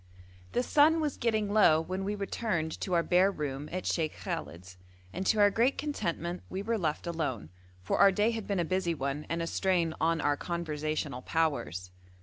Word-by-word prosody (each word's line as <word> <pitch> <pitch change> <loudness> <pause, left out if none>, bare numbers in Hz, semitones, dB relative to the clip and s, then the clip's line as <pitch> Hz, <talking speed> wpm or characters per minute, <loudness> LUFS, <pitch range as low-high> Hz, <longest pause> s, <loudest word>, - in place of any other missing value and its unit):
The 245 - +1
sun 305 +5 +4
was 300 -3 -1
getting 215 -3 0
low 180 -7 +6
when 185 +4 -3
we 205 +2 -2
returned 200 -5 -2
to 185 - -2
our 170 - +3
bare 185 +3 +4
room 145 -3 -4
at 185 +1 -4
Sheikh 155 -2 -1
Khallet's, 90 +2 -6 0.4
and 190 0 -3
to 220 - +3
our 205 0 +6
great 240 +6 +2
contentment 180 - -3
we 190 +1 -4
were 225 +1 -1
left 155 -2 -2
alone, 150 - -3 0.3
for 90 - -1
our 200 0 +7
day 210 +4 +2
had 225 -3 -5
been 200 -2 0
a 170 - +1
busy 180 -1 0
one, 140 +1 -3
and 170 0 -1
a - - -1
strain 170 -2 +1
on 165 +1 +2
our 145 -1 +1
conversational 155 -5 -3
powers. 90 - -1
170 Hz, 190 wpm, -30 LUFS, 155-205 Hz, 0.4 s, our